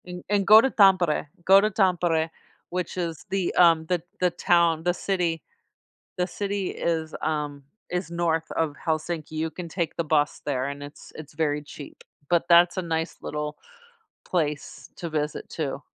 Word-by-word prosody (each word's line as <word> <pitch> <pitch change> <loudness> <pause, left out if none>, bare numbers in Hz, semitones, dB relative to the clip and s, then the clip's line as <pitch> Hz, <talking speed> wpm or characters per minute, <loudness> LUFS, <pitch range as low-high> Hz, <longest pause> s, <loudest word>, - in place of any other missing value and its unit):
And 180 0 -8
and 205 -2 +1
go 215 +1 +10
to 265 - +2
Tampere, 185 -7 +4 0.2
go 195 +1 +7
to 215 - +2
Tampere, 175 -5 +1 0.4
which 180 +1 -4
is 165 -4 -4
the, 190 -2 -1
um, 165 -2 +5
the 175 0 0 0.2
the 180 -1 +2
town, 170 -1 +2
the 175 +1 +2
city 175 -4 -1 0.8
the 180 0 0
city 200 0 -3
is, 160 -2 -2
um, 150 -2 -2 0.3
is 180 -1 -3
north 165 -1 0
of 160 -3 -1
Helsinki, 160 0 -2
you 160 +1 -2
can 175 +1 -7
take 170 0 -3
the 170 - -1
bus 150 -2 +1
there 130 -3 -1
and 140 0 -6
it's 145 +1 -12
it's 155 -1 -10
very 150 -1 0
cheap, 145 0 -11 0.3
but 175 -1 +3
that's 175 +2 +6
a - - +1
nice 160 -1 -3
little 150 0 -4 0.7
place 150 -5 -3
to 170 - -5
visit 150 -1 -3
too. 145 -3 -4
165 Hz, 170 wpm, -25 LUFS, 155-180 Hz, 0.8 s, go